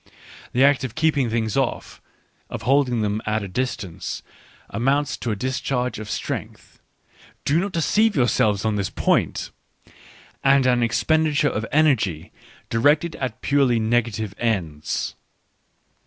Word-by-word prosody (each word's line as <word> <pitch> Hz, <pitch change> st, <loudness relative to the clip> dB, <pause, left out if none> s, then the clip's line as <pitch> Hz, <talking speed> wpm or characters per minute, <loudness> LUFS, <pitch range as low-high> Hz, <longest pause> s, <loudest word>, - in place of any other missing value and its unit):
The 125 Hz, -, +3 dB
act 140 Hz, -1 st, +4 dB
of 125 Hz, -4 st, -5 dB
keeping 155 Hz, -6 st, +2 dB
things 110 Hz, -2 st, -1 dB
off, 135 Hz, -3 st, -2 dB, 0.5 s
of -, -, -6 dB
holding 130 Hz, -3 st, +2 dB
them 105 Hz, 0 st, -1 dB
at 110 Hz, 0 st, 0 dB
a -, -, -4 dB
distance, 105 Hz, -4 st, -4 dB, 0.5 s
amounts 135 Hz, +6 st, +1 dB
to 120 Hz, -, -4 dB
a 110 Hz, -, 0 dB
discharge 125 Hz, +1 st, -2 dB
of 110 Hz, -1 st, -7 dB
strength, -, -, -5 dB, 0.3 s
— -, -, -27 dB
do 150 Hz, +4 st, +3 dB
not 195 Hz, +2 st, -2 dB
deceive 210 Hz, +7 st, +2 dB
yourselves 110 Hz, -5 st, +2 dB
on 110 Hz, -1 st, +1 dB
this 100 Hz, -2 st, -1 dB
point! -, -, 0 dB, 0.4 s
— -, -, -24 dB
and 135 Hz, -1 st, +4 dB
an 125 Hz, -1 st, +3 dB
expenditure 150 Hz, +5 st, +2 dB
of 110 Hz, -2 st, -3 dB
energy 130 Hz, -, +2 dB, 0.4 s
directed 145 Hz, +8 st, +2 dB
at 125 Hz, -2 st, -4 dB
purely 135 Hz, -4 st, +2 dB
negative 110 Hz, -2 st, 0 dB
ends. 85 Hz, -10 st, -2 dB
125 Hz, 140 wpm, -23 LUFS, 110-140 Hz, 0.5 s, act